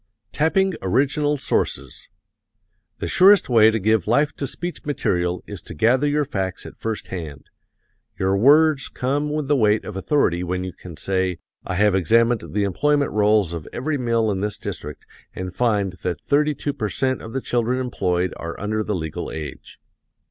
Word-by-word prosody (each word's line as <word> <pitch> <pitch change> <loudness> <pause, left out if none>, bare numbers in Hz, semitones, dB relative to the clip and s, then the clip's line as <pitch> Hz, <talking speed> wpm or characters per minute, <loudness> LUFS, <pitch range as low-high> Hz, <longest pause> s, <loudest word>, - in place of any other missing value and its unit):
Tapping 190 +5 +2
Original 145 +9 +1
Sources 135 - -2 0.9
The - - -4
surest 190 - +5
way 110 -3 +6
to 110 - 0
give 110 -2 +1
life 145 +6 +2
to 140 - -2
speech 175 +5 -5
material 90 - -1
is - - -8
to - - -10
gather 125 - +3
your 145 0 +1
facts 95 -10 -3
at - - -11
first 110 -1 -4
hand. 80 -6 -7 0.7
Your 95 +1 +2
words 145 +5 +5
come 145 +4 -2
with 150 -2 -2
the 145 - +3
weight 110 -4 +2
of 105 - -7
authority 95 - +1
when 90 +1 -2
you 95 -1 -5
can 85 -4 -11
say, 95 +3 -1 0.3
"I 90 - -2
have 105 +1 +3
examined 115 +5 +3
the 105 - 0
employment 145 +9 +1
rolls 105 -4 +2
of 80 -3 -6
every 145 +3 -2
mill 115 -3 +1
in 95 - -2
this 105 0 -2
district 75 0 -7 0.3
and 95 -1 -5
find 100 -4 +1
that 85 -4 -2
thirty 150 +1 +1
two 145 - -3
per 110 -6 -3
cent 130 +2 -1
of 115 - -9
the 135 - -1
children 120 +1 0
employed 90 -8 -1
are 85 0 -6
under 110 +2 -1
the 105 -1 -2
legal 80 -4 -4
age." 75 -3 -8
110 Hz, 175 wpm, -22 LUFS, 95-140 Hz, 0.9 s, way